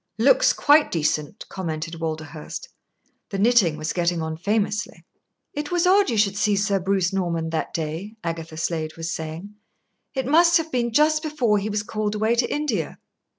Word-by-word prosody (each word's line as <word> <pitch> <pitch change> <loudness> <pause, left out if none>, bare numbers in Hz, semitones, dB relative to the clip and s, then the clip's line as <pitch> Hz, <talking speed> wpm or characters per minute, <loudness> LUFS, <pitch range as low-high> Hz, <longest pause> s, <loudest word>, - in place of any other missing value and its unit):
"Looks - - +5
quite 295 +1 +4
decent," 155 +3 -1
commented 165 -2 -5
Walderhurst. 155 - -5 0.6
The 195 - -4
knitting 200 -7 +4
was 155 0 -3
getting 175 -1 0
on 160 0 -3
famously. 205 +4 -2 0.5
"It 295 0 -4
was 350 -1 +2
odd 390 0 +4
you 230 - 0
should 205 -1 +2
see 205 0 +2
Sir 200 0 +1
Bruce 190 0 0
Norman 170 -4 -1
that 160 - -2
day," 165 +7 -4
Agatha 165 -1 -5
Slade 160 -1 -3
was 165 +1 -4
saying. 160 +6 -6 0.6
"It 265 -1 -1
must 335 +5 +5
have 325 -1 -3
been 235 -2 0
just 305 +5 +3
before 255 -10 +1
he 205 +2 -3
was 210 0 -1
called 215 0 -2
away 220 +2 +2
to 240 +1 +1
India." 245 - -2
200 Hz, 170 wpm, -23 LUFS, 165-240 Hz, 0.6 s, Looks